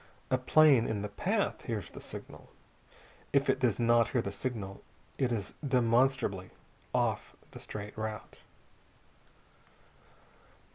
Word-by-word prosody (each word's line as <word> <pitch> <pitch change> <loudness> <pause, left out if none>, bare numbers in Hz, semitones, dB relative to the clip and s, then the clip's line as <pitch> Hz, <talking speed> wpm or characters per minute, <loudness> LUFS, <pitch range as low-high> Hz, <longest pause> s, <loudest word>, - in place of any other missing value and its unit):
A 130 - +4
plane 135 -2 +5
in 105 -2 -2
the 105 - -3
path 200 - -1
hears 110 -6 -4
the - - -10
signal. - - -10 0.8
If 140 -1 +4
it - - -2
does 120 -6 +2
not 120 -1 +4
hear 120 0 +1
the 100 - -3
signal, 100 -3 -4 0.4
it 130 -2 +2
is 105 -4 -3
demonstrably 125 -6 +2 0.4
off - - 0 0.2
the - - -10
straight 105 -1 -7
route. 110 0 -6
115 Hz, 125 wpm, -31 LUFS, 105-130 Hz, 0.8 s, plane